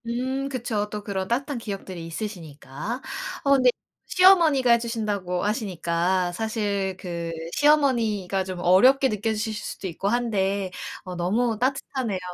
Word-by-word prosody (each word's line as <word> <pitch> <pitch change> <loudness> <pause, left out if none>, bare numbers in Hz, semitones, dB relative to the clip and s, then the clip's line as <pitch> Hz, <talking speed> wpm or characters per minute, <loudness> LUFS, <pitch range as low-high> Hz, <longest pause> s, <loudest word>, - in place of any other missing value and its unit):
음. 260 +3 -2
그쵸. 225 -5 -2
또 210 0 -5
그런 190 -2 -3
따뜻한 270 +4 -1
기억들이 195 -5 -6
있으시니까. 165 - -6 0.4
어 280 - +2
근데 255 -2 +5 0.4
시어머니가 335 -9 +5
해 235 - +7
주신다고 205 -6 -2
하시니까 180 -4 0
사실 200 -2 -2
그 170 -3 -4 0.2
시어머니가 230 -11 +2
좀 185 -1 -6
어렵게 255 +11 +5
느껴지실 215 0 -1
수도 210 -2 -5
있고 185 +3 -4
한데 200 -5 0 0.3
어 180 -1 -7
너무 215 +7 0
따뜻하네요. 255 -5 -1
210 Hz, 315 characters per minute, -25 LUFS, 185-245 Hz, 0.4 s, 해